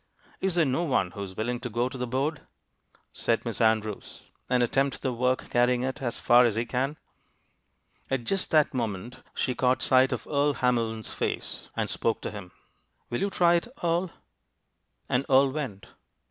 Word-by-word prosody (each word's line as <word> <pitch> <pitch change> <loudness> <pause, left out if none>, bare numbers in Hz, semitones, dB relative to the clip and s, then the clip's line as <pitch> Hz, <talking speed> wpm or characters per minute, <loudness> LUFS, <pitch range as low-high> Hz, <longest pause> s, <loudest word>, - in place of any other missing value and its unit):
"Is 190 -2 0
there 170 -2 +4
no 135 +5 0
one 125 - +1
who 100 - -7
is 95 -2 -7
willing 120 +2 -1
to 125 - -5
go 120 +3 0
to 130 - -8
the 125 -1 -3
board," 135 +4 -1 0.7
said - - 0
Miss - - -3
Andrews, 110 -2 -1 0.2
"and 125 -1 +3
attempt 135 +3 0
the 130 - 0
work, 125 +2 0
carrying 125 0 +3
it 130 +1 -3
as 120 -3 -2
far 120 +1 +6
as 115 -4 +2
he 115 +1 0
can?" 135 +5 -1 1.1
At 135 -2 -1
just 195 +9 0
that 155 -2 +3
moment 115 -1 -4
she 130 - 0
caught 125 +1 +1
sight 130 0 +4
of - - -3
Earle 145 0 +1
Hamlin's 115 -3 0
face, - - -3
and - - -1
spoke 115 - -1
to - - -4
him. 100 -4 -9 0.6
"Will 120 - -1
you 200 - +1
try 175 -3 +4
it, 170 +6 +1 0.2
Earle?" 170 +2 +1 1.0
And 125 +2 +1
Earle 135 0 +5
went. 130 -10 -5
125 Hz, 180 wpm, -27 LUFS, 115-140 Hz, 1.1 s, far